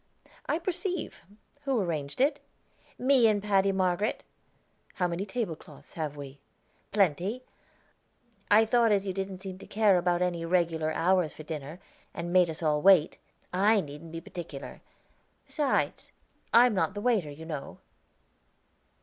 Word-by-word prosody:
"I 310 - +1
perceive. 360 0 -3 0.4
Who 270 -4 +1
arranged 155 - -3
it?" 285 +1 +2 0.6
"Me 255 -2 +4
and 210 -2 +2
Paddy 200 -1 +2
Margaret." 190 +2 0 0.7
"How 180 - 0
many 175 +4 -3
tablecloths 195 -7 -6
have 150 -3 -4
we?" 140 -1 -9 0.5
"Plenty. 200 - +1 1.1
I 215 +2 +6
thought 230 0 +3
as 200 -1 +2
you 190 - -2
didn't 190 0 -5
seem 190 -1 -7
to - - -12
care 205 -4 +3
about 175 0 +1
any 175 -2 -1
regular 165 -2 +1
hour 180 0 +2
for 155 - -11
dinner, 150 +1 -7 0.4
and 175 +1 -4
made 180 -2 +5
us 160 +1 -6
all 150 -1 +2
wait, 180 -4 +5 0.3
I 205 +4 +4
needn't 150 -1 -8
be 165 0 -6
particular; 165 -5 -8 0.6
besides, 295 -4 -1 0.4
I 235 +2 +7
am 245 - +2
not 195 +1 0
the 205 - -4
waiter, 210 -10 +1
you 150 +3 -10
know." 150 -4 -6
185 Hz, 145 wpm, -28 LUFS, 165-215 Hz, 1.1 s, I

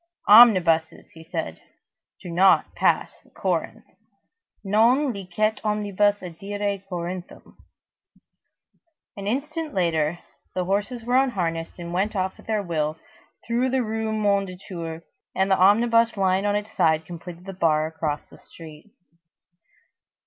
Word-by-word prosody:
"Omnibuses," 185 -8 +5 0.2
said 160 - -4 0.6
he, - - -12
"do 170 - -6
not 190 +3 +4
pass - - +1
the - - -25
Corinthe. - - -3 0.8
Non 235 +7 +3
licet 200 +2 -2
omnibus 205 -1 0
adire 200 +3 -4
Corinthum." 180 0 -7 1.6
An 200 -1 -6
instant 300 +6 -3
later, 165 -3 +1 0.4
the 180 -1 -1
horses 205 +5 -2
were 245 +2 +2
unharnessed 175 -11 -1
and 170 -1 -7
went 200 +4 -1
off 190 -1 -2
at - - -17
their 215 -2 0
will, 155 -3 -2 0.5
through 240 +3 0
the 260 0 +1
Rue 220 0 -3
Mondétour, 185 -5 -2 0.3
and 190 +1 +1
the 190 - +4
omnibus 230 +3 +4
lying 190 +1 +1
on 205 - +1
its 210 +1 -3
side 160 -5 +2
completed 175 +1 -10
the 195 - -7
bar 155 -4 +1
across 155 -2 -3
the - - -17
street. 160 +3 -14
195 Hz, 125 wpm, -24 LUFS, 170-215 Hz, 1.6 s, Omnibuses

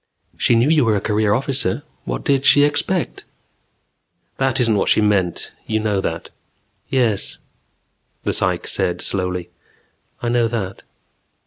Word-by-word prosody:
"She 120 - +3
knew 115 +3 +3
you 155 -1 +4
were 110 -2 +2
a - - +1
career 105 +1 +1
officer; 130 -3 0 0.2
what - - -4
did 135 -1 +2
she 145 +1 +6
expect 150 +5 0 0.6
?" - - -48
"That 135 -2 +1
isn't 115 -3 +3
what 100 - +1
she - - +5
meant. 100 -5 +1 0.2
You 110 0 0
know 105 -3 0
that." 85 -2 -4 0.6
"Yes," 120 -7 0 0.9
the - - 0
psych - - 0
said 90 - -1
slowly. 90 -2 -1 0.7
"I 120 - -2
know 120 -1 +2
that." 100 -5 -4
110 Hz, 145 wpm, -20 LUFS, 95-130 Hz, 0.9 s, she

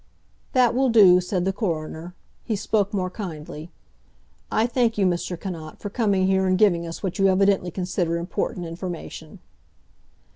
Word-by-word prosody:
"That 250 -3 +4
will 260 +1 +2
do," 190 -6 +7
said 180 0 -2
the 195 - 0
coroner. 170 -3 -4 0.3
He 225 - -2
spoke 205 0 0
more 185 -3 -2
kindly. 160 -5 -7 0.8
"I 220 - +2
thank 240 -2 +1
you, 200 - +2
Mr. 175 -1 -1
Cannot, 165 -5 -7
for 205 - -6
coming 200 -5 +1
here 190 0 +2
and 185 0 +2
giving 175 -5 +3
us 165 - -8
what 190 -1 -3
you 195 - +5
evidently 195 -1 +3
consider 180 -2 -2
important 175 +1 -3
information." 170 0 -7
185 Hz, 155 wpm, -24 LUFS, 175-205 Hz, 0.8 s, do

